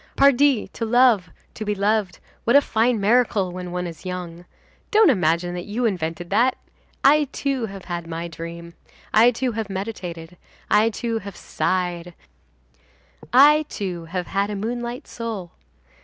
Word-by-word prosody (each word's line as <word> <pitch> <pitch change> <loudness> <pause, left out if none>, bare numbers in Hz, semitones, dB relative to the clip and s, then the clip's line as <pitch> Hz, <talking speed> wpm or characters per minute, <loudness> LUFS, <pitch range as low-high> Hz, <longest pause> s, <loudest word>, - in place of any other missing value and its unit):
Pardi, 275 -3 +4
to - - -5
love, 230 -6 +4 0.2
to 220 - -6
be 210 -1 -1
loved, 205 -1 0 0.3
what 235 - +2
a 285 - +8
fine 230 -2 +1
miracle 210 -3 +2
when 180 0 -6
one 180 0 -3
is 165 -3 -8
young! 180 -2 -6 0.4
Don't 425 -6 +5
imagine 175 -3 +1
that 175 0 -6
you 220 +4 -2
have 230 - +4
invented 170 0 -5
that. 250 +3 +3 0.5
I, 295 +2 +5
too, 270 -3 -2
have 195 -2 -10
had 170 -2 -5
my 165 +1 -4
dream, 170 0 -8 0.4
I, 225 +3 +7
too, 250 +1 -1
have 220 -2 -4
meditated, 180 -4 -6 0.3
I, 215 +2 +5
too, 230 0 -3
have 200 -2 -9
sighed; 175 -2 -2 1.2
I, 295 +4 +6
too, 180 -4 -5
have 180 +2 -4
had 200 +3 -1
a 210 - -3
moonlight 240 +4 -4
soul. 220 -7 -6
200 Hz, 155 wpm, -22 LUFS, 175-240 Hz, 1.2 s, a